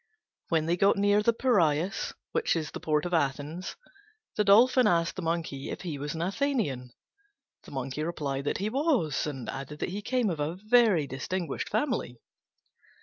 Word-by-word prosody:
When 160 -2 +2
they 170 +2 +1
got 200 +2 +4
near 205 +1 +3
the 235 - +4
Piræus, 195 - +1 0.2
which 465 - +1
is 155 -2 -3
the - - -6
port 150 0 0
of 175 - -3
Athens, 150 +3 -1 0.6
the 210 - +2
Dolphin 240 +4 +6
asked 170 -3 +2
the 185 - -4
Monkey 165 -5 -3
if - - -5
he 160 -6 -5
was 150 +3 -4
an 165 - -2
Athenian. 195 - -1 0.8
The - - -12
Monkey 135 +2 -4
replied 145 -5 -3
that - - 0
he 200 - -2
was, 255 - +1
and 135 -5 -5
added 135 +2 -6
that - - -3
he 200 +4 -4
came 240 -2 0
of 160 - -4
a 150 +3 -1
very 215 -5 +3
distinguished 140 +5 -4
family. 235 - -1
170 Hz, 175 wpm, -28 LUFS, 145-210 Hz, 0.8 s, Dolphin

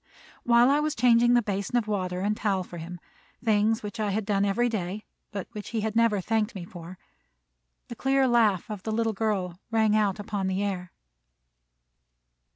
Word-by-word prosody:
While 240 +2 +5
I 290 - +3
was 305 0 -1
changing 240 0 +4
the 240 - +3
basin 200 +3 -3
of 225 -3 0
water 185 -3 -2
and 210 +2 0
towel 195 -3 0
for 175 -1 -9
him, 175 +2 -8 0.5
things 220 0 +2
which 210 +2 -6
I 210 -1 0
had 205 +1 -1
done 200 -1 +1
every 205 +5 +1
day, 210 -2 -3 0.3
but 200 -2 -5
which 210 -3 -7
he 225 -1 -2
had 220 0 -2
never 230 -3 +3
thanked 220 +3 -1
me 180 -3 -6
for, 175 0 -10 0.9
the 235 - -7
clear 270 +2 +2
laugh 220 -7 +3
of 205 -3 -5
the 220 - -4
little 225 0 0
girl 195 -4 -2
rang 220 -2 +2
out 210 -2 +2
upon 205 -2 -3
the 190 +1 -1
air. 185 -3 -3
210 Hz, 185 wpm, -27 LUFS, 195-230 Hz, 0.9 s, While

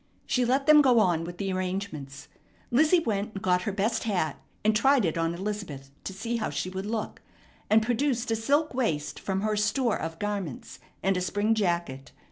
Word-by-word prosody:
She 250 -1 +1
let 265 +3 +1
them 305 0 +8
go 255 -4 +4
on 175 -5 +2
with 175 +1 -8
the 195 0 -2
arrangements. 180 -8 -4 0.4
Lizzie 310 +7 +4
went 210 -4 -2
and 195 - -6
got 180 -1 +2
her 205 - -2
best 220 +4 -1
hat, 180 -9 -1 0.2
and 215 0 +4
tried 265 0 +4
it 160 - 0
on 165 0 0
Elizabeth 180 -9 -5
to - - -3
see 230 +5 -3
how 225 - -2
she 145 +6 -3
would 190 +2 -5
look, 220 0 -4 0.5
and 220 +1 +5
produced 245 0 0
a - - +3
silk 285 +8 +1
waist 190 - -1
from 195 0 -2
her 215 0 0
store 210 +3 +1
of 165 0 -5
garments, 200 -9 -4 0.2
and 195 -1 +2
a - - -1
spring 205 +4 +1
jacket. 170 -10 -2
205 Hz, 195 wpm, -27 LUFS, 180-230 Hz, 0.5 s, them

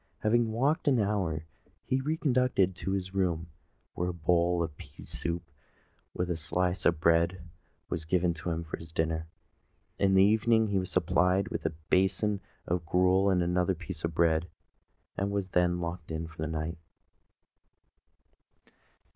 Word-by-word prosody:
Having 115 +1 +2
walked 145 +9 +1
an 130 -4 +4
hour, 95 -7 0 0.4
he 130 - +1
was 135 - -4
re 160 +1 +1
conducted 125 - +2
to 95 - -5
his 95 -1 -3
room 85 -4 -1 0.4
where 90 - -2
a - - -3
bowl 85 +1 +2
of 80 -3 -5
pease - - -12
soup 85 0 -3 0.7
with 90 0 -1
a - - 0
slice 90 +3 0
of 85 -2 +2
bread 85 +2 +3 0.5
was 80 -3 -4
given 90 +1 +2
to 80 +2 -5
him 85 0 -2
for 80 - -6
his 80 -1 -11
dinner. 80 0 -1 0.7
In 95 -1 +3
the 95 - +7
evening 110 +1 +3
he 100 -1 +2
was 95 - -4
supplied 90 +3 +2
with - - -2
a - - -3 0.2
basin 95 +2 +2 0.2
of 85 0 -1
gruel 90 +4 +3
and 90 -2 +3
another 90 +2 +1
piece 90 +1 -7
of 85 -1 -2
bread, 85 0 +2 0.7
and 100 0 0
was 100 -2 -2
then 90 -1 +2
locked 85 0 -5
in 80 0 -3
for 80 -1 -10
the 80 - -1
night. 80 +1 -3
90 Hz, 165 wpm, -30 LUFS, 85-100 Hz, 0.7 s, the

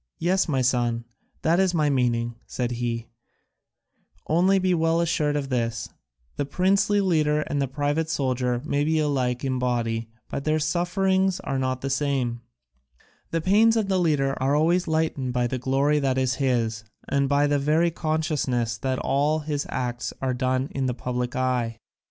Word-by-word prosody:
"Yes, 185 +3 +1
my 135 -3 +1
son, 120 -2 +1 0.4
that 165 +3 +3
is 190 -2 +2
my 155 -2 +2
meaning," 120 -3 +1
said 125 -1 -2
he; 120 -1 -3 1.2
"only 185 +5 +3
be 185 -1 +2
well 165 0 +2
assured 150 -3 +1
of 140 -2 -2
this: 115 -3 -2 0.5
the - - 0
princely 195 +4 +2
leader 155 -5 +2
and 145 -1 -2
the 135 - 0
private 145 +4 -1
soldier 125 -4 -1
may 145 -1 0
be 160 +1 +1
alike 135 -4 0
in 130 -1 -1
body, 115 -2 -1 0.2
but 140 - -4
their 155 +1 +1
sufferings 185 +4 +1
are 135 - -2
not 130 -1 -1
the 135 - -2
same: 130 -4 -1 0.9
the 165 - -1
pains 220 +6 +4
of 210 -3 0
the 190 -1 +2
leader 145 -5 +2
are 135 +2 +2
always 170 +4 +2
lightened 155 -5 -1
by 125 -1 +1
the 125 +1 -2
glory 135 +4 +2
that 135 -2 0
is 130 -1 +1
his 115 -4 0 0.2
and 140 -1 +1
by 145 0 +3
the 145 0 +2
very 155 +4 +2
consciousness 150 -8 -1
that 130 +1 -1
all 145 +5 +1
his 150 -1 -3
acts 125 -1 -3
are 130 -1 -1
done 130 +1 0
in 135 -1 -1
the 125 - -1
public 125 -1 -3
eye." 125 -3 0
140 Hz, 170 wpm, -25 LUFS, 125-160 Hz, 1.2 s, pains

